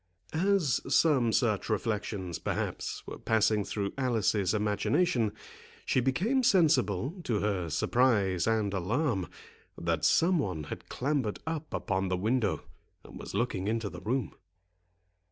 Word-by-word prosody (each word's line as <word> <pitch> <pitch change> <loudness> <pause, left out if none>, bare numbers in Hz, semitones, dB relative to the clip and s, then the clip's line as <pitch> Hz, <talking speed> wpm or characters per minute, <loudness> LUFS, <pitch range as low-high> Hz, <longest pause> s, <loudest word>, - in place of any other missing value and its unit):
As 175 -5 +2
some 130 -5 +4
such 110 -3 +1
reflections, 105 -5 -2
perhaps, - - -3
were - - -8
passing 110 -1 +2
through 100 0 -3
Alice's 110 -7 +1
imagination, 110 - +1 0.5
she - - +2
became 180 - +1
sensible, 160 - +2
to 115 -8 0
her 95 -5 -1
surprise 100 - +2
and 110 -3 +1
alarm, 100 - 0 0.5
that 85 -1 -1
some 170 +1 +4
one 90 - -2
had - - -8
clambered 130 -5 -1
up 160 -1 -4
upon 95 -1 -1
the 90 0 0
window, 110 +1 0 0.4
and - - -11
was - - -7
looking 100 -5 -1
into 110 -2 -1
the - - -9
room. 120 -3 -1
110 Hz, 130 wpm, -30 LUFS, 100-135 Hz, 0.5 s, some